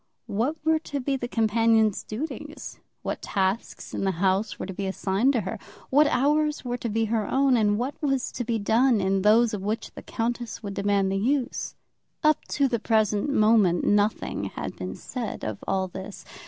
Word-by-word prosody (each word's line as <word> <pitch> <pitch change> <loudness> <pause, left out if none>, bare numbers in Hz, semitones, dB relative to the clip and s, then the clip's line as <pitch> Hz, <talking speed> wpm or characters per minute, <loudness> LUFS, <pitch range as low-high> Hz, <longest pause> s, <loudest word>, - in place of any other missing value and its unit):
What 235 +10 -1
were 320 0 +3
to 290 -2 -4
be 275 +1 -1
the 245 -2 -3
companion's 225 -2 +2
duties? 265 +9 -6 0.2
What - - -3
tasks 195 +2 -2
in - - -2
the 190 -1 +1
house 195 +3 +1
were - - -4
to 190 - -6
be 195 +1 -3
assigned 195 +7 +1
to 235 - +1
her? 225 +1 -5 0.3
What 290 +3 +6
hours 300 +2 +1
were 245 0 -2
to 235 - -3
be 225 +1 +1
her 220 -1 -1
own; 270 -1 +3
and 210 -3 +3
what 255 +5 -3
was 270 -4 0
to 245 - -3
be 230 -1 -1
done 225 +3 +3
in 190 0 +1
those 220 +3 +4
of 205 - -3
which 210 +3 -3
the - - -10
countess 235 0 -3
would 200 -1 -4
demand 200 -1 +1
the 195 - 0
use? 255 +3 -1 0.5
Up 305 0 +3
to 280 -1 +1
the 240 -3 -1
present 215 +1 +1
moment 215 -8 +4
nothing 205 +1 +1
had - - -5
been - - -5
said 240 -5 -5
of 110 -2 -4
all 190 -1 0
this. 190 +2 -9
225 Hz, 195 wpm, -26 LUFS, 200-255 Hz, 0.5 s, What